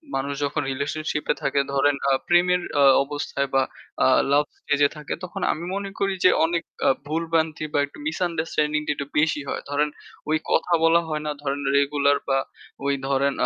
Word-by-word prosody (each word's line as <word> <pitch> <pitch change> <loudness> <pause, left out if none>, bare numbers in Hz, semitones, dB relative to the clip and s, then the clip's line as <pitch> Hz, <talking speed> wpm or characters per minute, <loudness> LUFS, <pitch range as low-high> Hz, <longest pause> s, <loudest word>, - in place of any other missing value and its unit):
মানুষ 140 +1 -1
যখন 150 +2 -1
রিলেশনশিপ 150 +3 -3
এ - - +3
থাকে 140 0 +1
ধরেন 140 +1 +3
আ - - +3 0.2
প্রেমের 180 +1 +4 0.2
আ - - +6 0.2
অবস্থায় 140 -1 -3
বা 135 - +4 0.4
আ - - +6 0.2
লাভ 145 +1 +5 0.2
স্টেজ 145 0 -1 0.2
থাকে 150 - -5
তখন 180 - -6
আমি 165 - -4
মনে 200 0 -3
করি 195 -1 +1
যে - - +9 0.2
অনেক 170 0 -1 0.2
আ - - +6 0.2
ভুল 160 +2 -1
ভ্রান্তি 160 -1 0
বা 145 - +2
একটু 140 - -16
misunderstanding 160 -3 -1
টা - - +2
একটু 140 - -5
বেশি 150 -1 +1
হয়। - - -3
ধরেন 150 +1 +1 0.4
ওই 155 - +3
কথা 175 - +2
বলা 165 +1 +5
হয় 155 -1 -2
না, 150 - -1
ধরেন 140 0 -2 0.2
রেগুলার 140 0 +3
বা 135 0 +2 0.5
ওই 140 - +2
ধরেন 140 0 +1
150 Hz, 185 wpm, -24 LUFS, 140-165 Hz, 0.5 s, যে